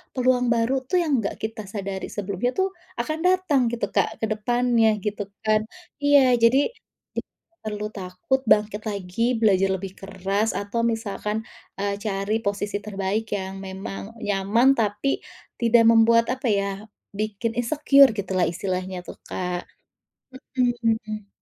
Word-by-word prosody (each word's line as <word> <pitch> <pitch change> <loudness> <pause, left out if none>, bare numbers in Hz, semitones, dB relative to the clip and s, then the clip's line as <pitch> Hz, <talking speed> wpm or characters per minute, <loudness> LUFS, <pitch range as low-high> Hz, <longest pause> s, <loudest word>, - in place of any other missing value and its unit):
peluang 250 -1 +2
baru 235 +3 +2
tuh 360 -2 +2
yang 290 -7 +2
nggak 200 - -2
kita 220 -2 -4
sadari 195 -1 -4
sebelumnya 200 +4 -2
tuh 380 0 +1 0.2
akan 310 +7 -2
datang 365 -7 +3
gitu, 230 -4 -2
Kak, - - 0
ke - - +5
depannya 230 0 +2
gitu 205 -1 -3 0.2
kan. 215 0 +3 0.4
Iya, 275 -4 +5
jadi 260 - +4 0.4
d - - 0
nggak 335 - -16
perlu 210 0 -3
takut, 185 +7 -2
bangkit 210 0 +3
lagi, 205 +5 -1
belajar 195 -4 +3
lebih 190 0 -6
keras 195 +2 -1
atau 205 +3 -2
misalkan, 220 -1 -2 0.3
eee, 200 0 -2
cari 205 +1 -1
posisi 205 -1 -2
terbaik 205 +1 -2
yang 190 0 -5
memang 195 +3 -7
nyaman 205 +5 +2
tapi 215 +6 0 0.4
tidak 235 0 +5
membuat 230 +1 +5
apa 260 0 -2
ya, 200 -2 +1 0.4
bikin 215 +2 -2
insecure 280 +2 +5
gitulah 190 -3 0
istilahnya 185 +1 -3
tuh, - - -10
Kak. 180 -1 -3 0.9
Mhm. 225 -4 0
215 Hz, 135 wpm, -24 LUFS, 200-240 Hz, 0.9 s, ke